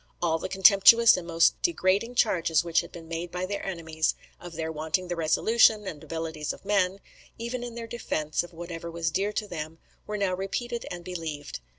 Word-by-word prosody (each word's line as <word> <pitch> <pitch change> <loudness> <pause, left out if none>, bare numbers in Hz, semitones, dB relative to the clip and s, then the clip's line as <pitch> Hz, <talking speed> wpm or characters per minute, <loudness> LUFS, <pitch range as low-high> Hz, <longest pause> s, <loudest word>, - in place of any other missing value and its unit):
All 165 -2 +1
the - - -5
contemptuous 200 +4 +7
and 175 -2 -5
most 165 -1 +3
degrading 230 - +1
charges 170 -9 +2
which 170 -1 +2
had - - -12
been 165 -1 -11
made 165 +1 -4
by 180 +1 -3
their 200 +2 -4
enemies, 160 -4 -1 0.2
of 175 -1 -10
their 160 0 -3
wanting 160 +4 -2
the 175 - -1
resolution 215 +6 +3
and 155 -6 -7
abilities 160 -2 -4
of - - -15
men, 195 -1 +1 0.4
even 235 +2 -4
in 240 -1 -7
their 235 -1 -5
defence 155 -10 -2
of 175 - -10
whatever 170 0 -7
was 165 0 -2
dear 200 +5 0
to 210 0 -2
them, 160 -3 -6 0.3
were 210 0 -3
now 200 -2 0
repeated 235 +6 -3
and 175 -1 -7
believed. 160 - -5
175 Hz, 195 wpm, -27 LUFS, 165-205 Hz, 0.4 s, contemptuous